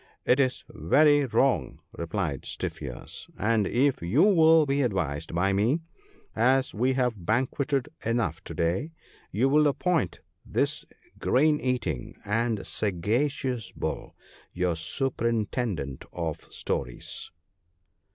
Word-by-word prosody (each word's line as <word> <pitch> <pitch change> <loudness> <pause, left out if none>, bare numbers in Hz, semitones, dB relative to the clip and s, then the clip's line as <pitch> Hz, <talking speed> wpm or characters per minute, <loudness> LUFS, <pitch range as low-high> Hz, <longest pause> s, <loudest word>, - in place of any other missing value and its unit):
It 125 - +4
is 130 -2 +1
very 145 - +4
wrong,' 130 +2 +1 0.2
replied 85 -4 -3
Stiff - - -4
ears; - - -8
' - - -27
and 110 -4 +2
if 135 +2 +2
you 95 - +3
will 165 -5 +6
be 140 0 +1
advised 85 - -1
by 95 +3 +2
me 115 +11 +2 0.3
— - - -31 0.2
as 135 -1 -1
we 125 +5 +1
have 125 -7 -1
banqueted 130 - 0 0.2
enough 115 -8 -1
to 80 - -7
day 85 - -1 0.2
— - - -29
you 115 +7 +2
will 150 +2 +4
appoint 155 - 0 0.2
this - - -1 0.3
grain 150 +3 +3
eating 115 - -2
and 110 0 0
sagacious 115 - -1
Bull - - -4 0.4
your 90 -1 0
Superintendent 110 - -2
of 80 -3 -5
Stores.' - - -3
115 Hz, 125 wpm, -27 LUFS, 90-135 Hz, 0.4 s, will